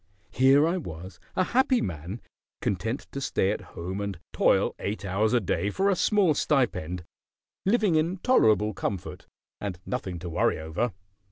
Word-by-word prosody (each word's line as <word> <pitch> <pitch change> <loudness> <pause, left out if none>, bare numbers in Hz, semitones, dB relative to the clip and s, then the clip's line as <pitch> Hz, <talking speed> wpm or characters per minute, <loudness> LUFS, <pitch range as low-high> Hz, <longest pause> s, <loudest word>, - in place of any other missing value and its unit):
Here 135 +6 +5
I 175 +3 +1
was 90 - -8 0.2
a - - +3
happy 260 +5 +3
man; 85 +6 -4 0.4
content 110 +7 -1
to 140 - -5
stay 100 -6 +1
at - - -3 0.2
home 95 +4 -4
and 100 -3 -3 0.2
toil - - +3
eight 100 +1 -3
hours 100 +3 +1
a 125 - +4
day 100 0 -1
for 195 - +1
a - - +2
small 195 -3 +3
stipend; 90 - 0 0.6
living 210 -3 +3
in 165 +4 +1
tolerable 110 - +3
comfort, 95 -2 -4 0.3
and 95 -4 -4
nothing 100 -9 -3
to 85 +1 -6
worry - - +2
over. 80 +9 -2
110 Hz, 160 wpm, -27 LUFS, -, 0.6 s, Here